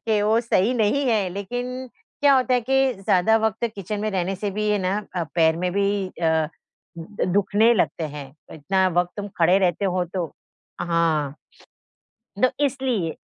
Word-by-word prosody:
कि 210 -2 +2
वो 220 +2 +3
सही 230 0 +1
नहीं 235 +5 +1
है, 210 -5 +1
लेकिन 245 +7 -5 0.3
क्या 285 -1 +6
होता 255 -1 +2
है 250 - +2
कि 270 +1 +2
ज़्यादा 195 +2 +2
वक़्त 220 -1 0
तक 230 - -2
किचन 205 +1 -5
में 215 +1 -1
रहने 190 -1 -1
से 205 +1 -3
भी 210 +2 -2
ये 210 -1 +2
ना 190 +2 0 0.2
अ, 170 - 0
पैर 160 -1 +3
में 180 +1 -1
भी 200 0 0
अ, 160 -3 0 0.5
द 175 +6 -4
दुखने 205 +3 +4
लगते 175 -4 0
हैं, 140 -2 -9 0.2
इतना 190 +5 +1
वक़्त 175 0 +1
तुम 205 0 -5
खड़े 175 +2 +5
रहते 185 0 0
हो 185 -1 0
तो 180 -3 0 0.6
हाँ। 160 -4 0 1.1
दो 255 +3 +4 0.2
इसलिए। 255 - -1
200 Hz, 175 wpm, -23 LUFS, 175-225 Hz, 1.1 s, क्या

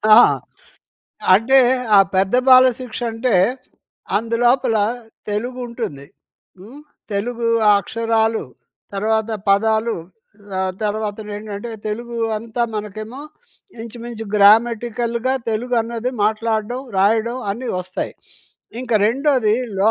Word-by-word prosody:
ఆ! - - +9 1.2
అంటే, 235 +7 +4 0.4
ఆ - - +9 0.2
పెద్ద 190 +3 +1
బాలశిక్షంటే, 250 -2 +3 0.8
అందులోపలా 230 0 +2 0.5
తెలుగుంటుంది. 235 - -4 0.5
హ్మ్, 235 +10 -12 0.3
తెలుగూ 230 +3 -2 0.2
ఆ - - +8
అక్షరాలు, 225 0 0 0.5
తర్వాత 220 +2 0 0.2
పదాలు, 220 +3 +2 0.6
ఆహ్, 190 0 -1
తర్వాతనేంటంటే, 210 0 -4 0.2
తెలుగూ 235 +2 -5 0.2
అంతా 230 +2 -3
మనకేమో 215 +4 -6 0.6
ఇంచుమించు 230 0 -7
గ్రామటికల్‌గా 235 +3 +3 0.2
తెలుగు 240 +3 -2
అన్నది 235 +2 -4
మాట్లాడడం, 220 +2 -1 0.2
రాయడం 220 +4 +2 0.2
అన్ని 245 +4 -6
వస్తాయి. 185 0 -5 0.7
ఇంక 255 -2 -8 0.2
రెండోది 255 -2 +2 0.2
లో 205 +3 +4
225 Hz, 85 wpm, -20 LUFS, 210-240 Hz, 1.2 s, ఆ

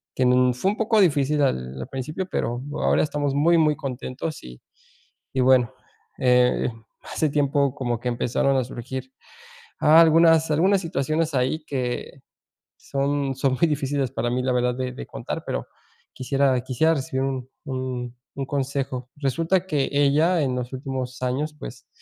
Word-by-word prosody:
que 130 - +1
n 125 0 +4
fue 185 +11 0
un 210 - -6
poco 220 0 +2
difícil 150 -5 +3
al 65 - -1
al - - -6
principio 150 +8 -4
pero 120 -7 -2
ahora - - +2
estamos 145 -2 -1
muy, 165 +5 +4
muy 155 -2 +3
contentos. 135 +3 -5
Y 60 0 -11 0.7
y 130 - +1
bueno, 125 -2 +4 0.5
eh, 125 0 +3 0.3
hace 155 - -1
tiempo 140 -1 +1
como 120 -5 -2
que 125 - -5
empezaron 125 +3 +1
a 130 - +2
surgir 130 +1 -7 0.7
algunas 160 0 +6
algunas 185 +6 +3
situaciones 160 -1 -1
ahí 130 +4 0
que 130 -1 -4 0.6
son 140 0 -1
son 135 0 +1
muy 170 - +4
difíciles 140 -3 -1
para 120 +1 -1
mí 125 +1 -1
la 130 - +1
verdad 125 0 +1
de 130 0 -3
de - - -7
contar - - -6
pero 60 - -3 0.5
quisiera 135 0 +1
quisiera 130 +6 +2
recibir 135 -2 -2
un 130 -2 -3 0.2
un 130 -2 -4 0.2
un 135 - -3
consejo. 135 -2 -3
Resulta 165 +6 0
que 145 -6 0
ella 145 +5 +3
en 130 -3 0
los 125 +1 -4
últimos 130 -1 -5
años, 135 +5 -1
pues - - -10
135 Hz, 160 wpm, -24 LUFS, 125-150 Hz, 0.7 s, algunas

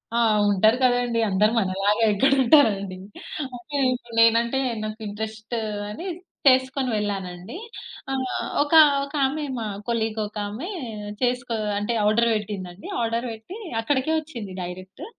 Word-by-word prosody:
ఆ! - - +2 0.3
ఉంటారు 215 +5 +4
కదండీ! 245 -2 +2
అందరూ 210 +3 +3
మనలాగా 195 +3 +1
ఎక్కడ 270 +7 +3
ఉంటారండి. 205 -9 +4 0.6
అంటే, 285 +5 -9 0.2
ఇపుడు 240 -2 -6
నేనంటే 235 +3 +4 0.2
నాకు 215 +1 -5
ఇంట్రెస్ట్ 220 +2 -5 0.3
అని 335 - -6 0.4
చేసుకొని 260 0 +3
వెళ్ళానండి. 195 - -4 0.5
ఆహ్, 265 -1 -1 0.4
ఒక, 295 - -5 0.3
ఒక 280 - -8
ఆమె 300 +3 -3 0.2
మా 220 - -3 0.2
కొలీగొక 220 -2 -2
ఆమె, 260 - -6 0.5
చేసుకో 245 -1 0 0.2
అంటే 210 +3 -1
ఆర్డర్ 230 +2 +3
వెట్టిందండి. 200 -3 -5
ఆర్డర్ 230 +2 -1
వెట్టి 225 - -9 0.2
అక్కడికే 270 +4 0
వచ్చింది 235 - -8
డైరెక్టు. 185 - -8
225 Hz, 120 wpm, -24 LUFS, 205-255 Hz, 0.6 s, ఉంటారు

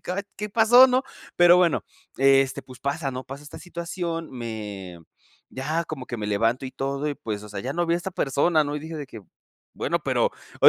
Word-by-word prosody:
caray, 185 +3 -3
¿qué 210 +1 -4
pasó, 230 +4 +7
no?". 255 +1 +2 0.3
Pero 175 0 +8
bueno, 175 -4 +3 0.3
este, 135 0 +4
pues 130 -2 -13
pasa, 140 0 -1
¿no? 130 0 -6
Pasa 135 +2 -8
esta 145 - -10
situación, 170 -1 -4
me 105 -7 -6 0.5
ya 155 +6 -2
como 150 -5 -6
que 120 - -4
me 105 -2 -4
levanto 115 +5 +1
y 130 - -5
todo 140 +2 -2
y 145 - -2
pues, 105 -5 -5
o 105 - -10
sea, 105 - -5
ya 130 - -3
no 175 +2 0
vi 170 - +2
a - - +2
esta 175 +2 -4
persona, 155 0 +2
¿no? 145 +1 -3
Y - - -2
dije 160 +1 -7
de 145 -3 -5
que: 115 - -10 0.5
"Bueno, - - 0
pero - - +1
pero", - - +3
145 Hz, 220 wpm, -25 LUFS, 130-170 Hz, 0.5 s, Pero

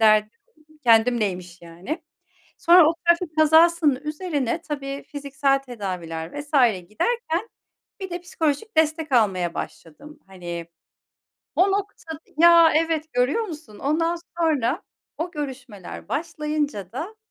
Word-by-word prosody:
derdim, 215 -1 +5 0.5
kendimleymiş, 215 -7 +2
yani." 180 - -6 0.6
Sonra 350 0 +7
o 330 - +1
trafik 340 -2 +2
kazasının 320 -1 +5
üzerine 300 -2 -2
tabii 275 -3 -5
fiziksel 280 -1 0
tedaviler 185 - -6
vs. 290 0 -11 0.4
giderken 445 - -1 0.5
bir 380 - -5
de 350 0 -5
psikolojik 330 +3 -2
destek 315 -1 +1
almaya 190 -8 +2
başladım. 290 - -9
Hani, 175 -3 -7 0.9
o 385 +2 +4
noktada 390 -6 -4 0.2
Ya, 335 -1 +7
evet 315 -1 0
görüyor 250 - +2
musun? 305 - -9
Ondan 330 +4 0 0.2
sonra 300 -4 +1 0.4
o 345 +2 -3
görüşmeler 260 - -7
başlayınca 300 - -3
da, 335 - -6
295 Hz, 110 wpm, -23 LUFS, 220-330 Hz, 0.9 s, Sonra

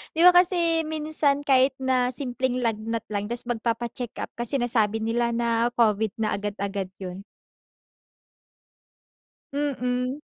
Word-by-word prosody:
'di 325 - +2
ba 360 - +11
kasi 345 -2 +3
minsan 305 -2 +1
kahit 265 -1 +4
na 255 -1 +1
simpleng 255 -2 -2
lagnat 225 0 -1
lang 205 -1 -2
tas 240 +2 -3
magpapa-checkup 235 +1 -3
ka 240 - -1
sinasabi 225 -4 +1
nila 235 +1 0
na 235 0 +1
Covid 215 -3 +2
na 215 -2 0
agad-agad 200 -1 -3
yun. 185 +1 -7 2.3
Mm. 255 -2 -1
240 Hz, 115 wpm, -25 LUFS, 220-270 Hz, 2.3 s, ba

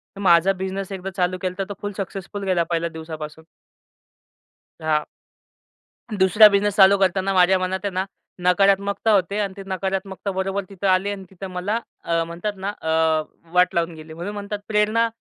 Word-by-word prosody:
तर - - -10
माझा 175 0 +5
बिझनेस 190 +1 -4
एकदा 195 0 -5
चालू 185 0 +1
केला. 185 -1 -2
तर - - +1
तो 205 - -3
फुल 205 - -3
सक्सेसफुल 195 +1 -5
गेला 180 -3 +2
पहिल्या 170 0 0
दिवसापासून. 160 -1 -8 1.4
हां. 155 -1 +1 1.1
दुसरा 195 +3 +7
बिझनेस 200 0 +1
चालू 200 0 +7
करताना 190 0 +1
माझ्या 185 +1 +5
मनात 185 +1 -1
आहे 200 - -1
ना, 185 +1 0 0.4
नकारात्मकता 200 +3 +3
होते 200 0 +2
आणि 200 -2 -1
ते 195 - -7
नकारात्मकता 190 +1 -3
बरोबर 190 +1 -2
तिथं 195 0 -3
आले 190 +2 +2
आणि 195 -1 -6
तिथं 190 0 -8
मला 195 +5 -1 0.2
अ, 165 0 +1
म्हणतात 175 +5 -4
ना 195 +1 -3
अ, 160 - -6 0.7
वाट 180 0 +3
लावून 170 0 0
गेली. 155 0 -11
म्हणून 175 +6 -5
म्हणतात 205 0 -5
प्रेरणा 215 +2 +2
190 Hz, 170 wpm, -22 LUFS, 180-200 Hz, 1.4 s, दुसरा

